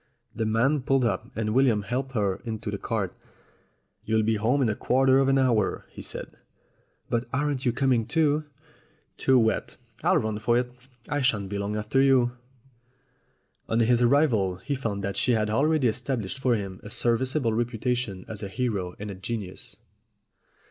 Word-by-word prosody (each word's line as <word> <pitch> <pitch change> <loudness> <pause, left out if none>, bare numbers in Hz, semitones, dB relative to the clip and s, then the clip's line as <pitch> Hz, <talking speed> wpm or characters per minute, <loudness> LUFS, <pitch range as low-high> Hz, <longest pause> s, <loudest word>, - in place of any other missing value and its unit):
The 110 -1 -1
man 125 +7 +2
pulled 135 0 +2
up, 100 -6 -1
and 110 -1 -1
William 120 -5 +3
helped 130 +5 -3
her 100 -3 +1
up - - -16
into 110 -1 -4
the 100 - -4
cart. 100 -5 -2 0.9
"You'll 110 0 +1
be 110 +1 +2
home 125 +6 +2
in 120 - +2
a - - +1
quarter 130 +3 +3
of 135 - +3
an 135 0 +4
hour," 120 -7 +1
he - - -10
said. - - -7 0.7
"But 120 +1 +1
aren't 140 -1 -1
you - - +4
coming 125 -2 +1
too 155 -1 +2 0.4
?" - - -38
"Too 130 -1 +4
wet; 110 -3 +1 0.3
I'll - - +4
run 110 -1 -1
for 120 +2 +2
it 125 0 -1 0.4
I 145 0 -1
shan't 105 -7 +1
be 100 0 -3
long 100 +1 -2
after 105 +5 +1
you." 130 -3 +4 1.4
On 115 - +2
his 120 +1 +3
arrival 120 -8 +3
he 125 +11 -4
found 110 -7 -3
that 100 0 -3
she 125 - +2
had 110 -1 +1
already 145 +3 +2
estab 120 +1 -1
lished 95 +7 -6
for 130 -2 +2
him 95 -3 -5
a 105 - -9
serviceable 120 +2 +1
reputation 120 -3 -2
as 105 -2 -7
a 100 - -4
hero 100 -6 -2
and 105 0 -6
a - - -5
genius. 100 0 -6
115 Hz, 185 wpm, -26 LUFS, 105-130 Hz, 1.4 s, an